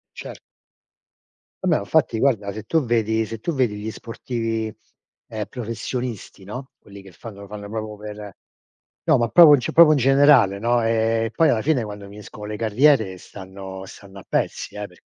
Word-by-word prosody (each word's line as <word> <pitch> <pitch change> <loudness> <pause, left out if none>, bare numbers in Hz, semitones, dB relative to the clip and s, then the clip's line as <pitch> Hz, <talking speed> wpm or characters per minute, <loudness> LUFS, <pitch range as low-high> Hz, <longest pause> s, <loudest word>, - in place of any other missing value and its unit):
Cer - - -9 1.3
Vabbè, 160 -4 +3
ma - - -2
infatti, 145 -8 +1
guarda, 110 -6 +1
se 110 +1 -8
tu 160 -4 0
vedi 110 -1 0
se 115 0 -7
tu 170 - -2
vedi 120 -6 0
gli 105 +2 -5
sportivi, 115 -1 -4 0.6
ehm, 110 -2 -5
professionisti, 115 -3 -6
no, 125 +7 -8
quelli 100 -1 -14
che 95 0 -14
fanno 100 +2 -11
lo 100 - -10
fanno 100 0 -9
proprio 110 -1 -5
per 105 -1 -9 0.7
no, - - +4
ma 120 -1 +1
proprio, 155 -5 +8
cioè, 125 - -3
proprio 165 -2 +7
in - - +1
generale, 135 -6 +4
no, 120 +1 +1
ehm, 115 0 0
poi 165 +5 +3
alla 110 - +1
fine, 140 -6 +1
quando 105 -1 -8
finiscono 105 +1 -11
le 105 0 -5
carriere, 110 -3 +2
stanno 95 0 -10
stanno 100 -1 -13
a - - -13
pezzi, - - -2
eh, 105 0 -5
perché 90 -2 -18
110 Hz, 180 wpm, -22 LUFS, 105-125 Hz, 1.3 s, proprio